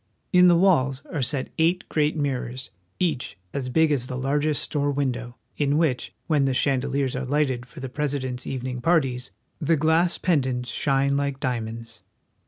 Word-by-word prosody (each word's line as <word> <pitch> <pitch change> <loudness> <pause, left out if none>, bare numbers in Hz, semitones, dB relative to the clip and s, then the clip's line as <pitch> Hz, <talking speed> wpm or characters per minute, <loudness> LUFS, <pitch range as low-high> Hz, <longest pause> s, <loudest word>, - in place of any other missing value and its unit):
In 180 0 +7
the 175 - +6
walls 140 -8 +3
are 150 - -1
set 130 +1 -1
eight 170 +3 +2
great 150 0 +1
mirrors, 130 -3 -3 0.3
each 150 - -1 0.2
as 130 -2 -3
big 160 +3 +3
as 130 -4 0
the 130 - -4
largest 145 +3 0
store 145 -1 0
window, 130 -4 -2 0.2
in 145 0 +2
which, 150 - 0
when 150 -3 +2
the 135 -1 +1
chandeliers 135 0 0
are 130 - -2
lighted 130 -2 0
for 125 - -11
the 130 - -4
President's 130 -3 -3
evening 125 -1 -4
parties, 130 -6 +1 0.3
the 160 0 +2
glass 160 +3 +2
pend 155 -8 +1
ants 125 -2 -3
shine 140 0 +1
like 140 -1 -1
diamonds. 115 -3 -4
140 Hz, 170 wpm, -25 LUFS, 125-150 Hz, 0.3 s, In